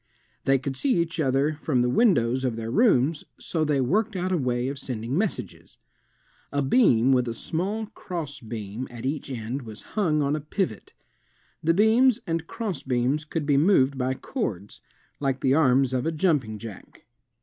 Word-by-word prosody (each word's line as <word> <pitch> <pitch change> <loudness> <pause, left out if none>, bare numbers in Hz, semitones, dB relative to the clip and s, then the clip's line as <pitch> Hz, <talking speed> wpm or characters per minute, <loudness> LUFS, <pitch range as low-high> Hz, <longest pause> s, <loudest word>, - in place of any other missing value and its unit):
They 135 0 +4
could 135 +1 -4
see 265 - +1
each 170 0 -1
other 145 +2 +1
from 130 -6 +1
the - - +2
windows 130 - +3
of 125 -3 0
their 115 0 -4
rooms 155 - +3 0.2
so 160 -2 -1
they 150 -2 +1
worked 200 - +1
out 185 0 -1
a 180 - +2
way 125 -1 0
of 140 0 -4
sending 125 -1 -4
messages. 165 - -3 0.7
A 145 0 0
beam 135 - +4
with 125 -2 +3
a 115 - -3
small 195 - -2
crossbeam 130 - -6
at 120 0 -8
each 140 +1 -3
end 125 +2 -4
was 110 -3 -10
himg 160 -8 +1
on 140 +1 +1
a 155 - -3
pivot. 150 - -3 0.7
The 165 +1 +3
beams 230 +4 +4
and 165 0 -2
crossbeams 145 - -1
could 155 0 -3
be 145 -1 +3
moved 140 -4 +4
by 130 0 -1
cords, 105 - -5 0.4
like 135 -2 -1
the 130 - +3
arms 135 -3 +3
of 130 +3 0
a - - +1
jumping 150 - 0
jack. 110 -2 -11
140 Hz, 170 wpm, -25 LUFS, 125-165 Hz, 0.7 s, They